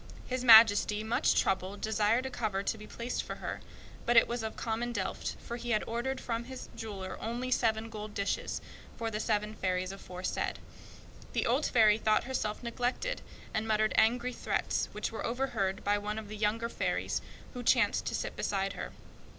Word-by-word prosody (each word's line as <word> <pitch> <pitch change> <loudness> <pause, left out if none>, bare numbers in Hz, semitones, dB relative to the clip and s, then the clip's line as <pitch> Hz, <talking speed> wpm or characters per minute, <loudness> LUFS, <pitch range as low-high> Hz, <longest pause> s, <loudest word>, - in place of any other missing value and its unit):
The 255 - +1
King 250 -1 -2
ordered 220 -1 +12 1.5
a - - -2
cover 205 -5 -1
to - - 0
be 215 - -10
placed 235 +1 -3
for - - -6
her, - - -5 0.5
but 240 0 +4
it - - +8
was 240 0 -2
of 220 0 -4
common 230 +1 -2
earthenware, - - -3
for 235 - -6
he 240 0 -6
had 215 -2 +2
ordered 240 +4 -2
from 230 0 -3
his 260 0 -8
jeweler 195 -4 -6
only 240 +3 -3
seven 225 -2 +2
gold 215 -1 -7
dishes, 200 0 -1 0.4
for 225 -1 -2
the 210 - -2
seven 210 -1 0
fairies 185 -2 -1
aforesaid. 185 -2 -3 0.8
The - - +1
old 260 +6 +2
fairy 215 -3 +5
thought 215 -1 +3
herself 240 -4 -2
neglected, 245 - -2 0.3
and 220 +1 -1
muttered 215 0 +2
angry 245 +2 +3
threats, - - -1
which - - -3
were - - -5
overheard 230 -6 -1
by 205 0 +2
one 210 +1 -3
of 215 -2 -6
the 215 - -6
younger 220 +2 +1
fairies, - - -1 0.3
who 250 - -5
chanced 245 - +3
to - - -1
sit - - -3
beside 195 -1 -1
her. - - -6
220 Hz, 175 wpm, -31 LUFS, 210-240 Hz, 1.5 s, ordered